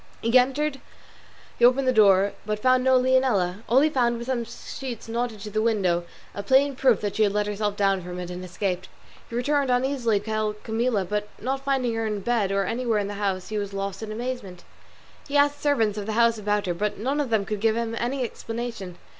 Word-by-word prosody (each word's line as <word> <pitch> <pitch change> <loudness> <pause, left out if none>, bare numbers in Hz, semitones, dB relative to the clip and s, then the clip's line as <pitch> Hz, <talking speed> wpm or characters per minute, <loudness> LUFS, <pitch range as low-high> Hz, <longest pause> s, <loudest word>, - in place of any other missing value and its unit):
He 230 - +1
opened 270 -2 -1
the - - +5
door, 200 -4 +6
entered, 200 - -2
but 210 0 -1
found 255 +3 +3
no 260 0 +5
Leonela; 250 -8 +2
all 255 +4 +5
he 310 - +4
found 240 -4 +1
was 235 - -6
some 255 -2 -1
sheets 235 +1 -7
knotted 230 -2 -3
to 210 0 -7
the 215 +1 0
window, 190 -6 +1 0.3
a 200 - -4
plain 265 +6 +3
proof 255 -4 +3
that 205 -1 -3
she - - +1
had 205 -2 +3
let 210 0 +1
herself 205 0 -2
down 195 -2 +1
from 180 0 -7
it 180 0 -6
and 180 +1 -6
escaped. 185 0 -3 0.4
He 230 - -6
returned, 280 +2 +1
uneasy, 250 -4 +1
to 205 - -14
tell 215 -1 -1
Camilla, 220 -1 -1
but 210 +3 -2
not 265 +4 -3
finding 265 -4 0
her 225 0 -1
in 210 -2 -3
bed 215 -2 0
or 195 0 +1
anywhere 235 -1 0
in 205 -1 -1
the - - -4
house 190 -2 -1
he 215 -1 -2
was 200 -1 -5
lost 195 0 -4
in 220 -1 -5
amazement. 220 -6 -5 0.6
He 285 0 0
asked 285 0 +3
the - - -21
servants 225 -8 +1
of 205 - -6
the 220 - -2
house 230 0 +3
about 210 0 0
her, 180 - -1
but 210 +4 -2
none 270 +7 -1
of 275 - -3
them 220 -3 +1
could 210 0 -3
give 220 +1 +2
him 230 -1 -2
any 255 +2 -1
explanation. 225 -6 -5
220 Hz, 225 wpm, -25 LUFS, 200-250 Hz, 0.6 s, door